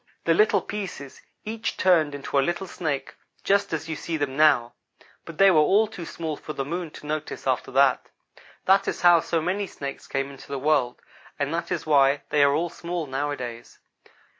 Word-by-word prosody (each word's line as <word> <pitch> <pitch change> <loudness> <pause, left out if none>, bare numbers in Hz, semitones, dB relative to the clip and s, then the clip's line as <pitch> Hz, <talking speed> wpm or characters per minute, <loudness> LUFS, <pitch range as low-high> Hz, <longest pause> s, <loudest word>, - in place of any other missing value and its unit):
The 165 - +3
little 210 +6 +3
pieces 180 -10 -7 0.2
each 220 +1 -4
turned 160 -6 +3
into 140 0 -1
a - - +5
little 175 +6 -2
snake, 150 -7 -4 0.3
just 200 +1 +2
as 160 -1 -3
you 160 - -3
see 165 +1 -4
them 140 -3 -2
now, 140 -6 +4 0.5
but 165 -2 -10
they 195 0 +7
were 160 - +5
all 195 +8 +4
too 200 -6 -8
small 160 -2 -4
for 155 - -8
the 135 -2 -3
Moon 170 +3 -4
to 150 - -13
notice 155 0 -4
after 130 -2 0
that. 135 -1 +3 0.6
That 195 +1 +4
is - - -2
how 175 -1 +7
so 165 0 -1
many 195 +4 -1
Snakes 140 -5 -7
came 135 0 -2
into 135 - -13
the 140 - -4
world; 135 -3 +1 0.4
and 145 +2 -2
that 170 +2 -3
is 175 - -2
why 140 -2 +3
they 150 - +3
are 140 0 +4
all 170 +3 0
small, 170 -1 -4
nowadays. 130 -4 -5
155 Hz, 195 wpm, -25 LUFS, 140-175 Hz, 0.6 s, they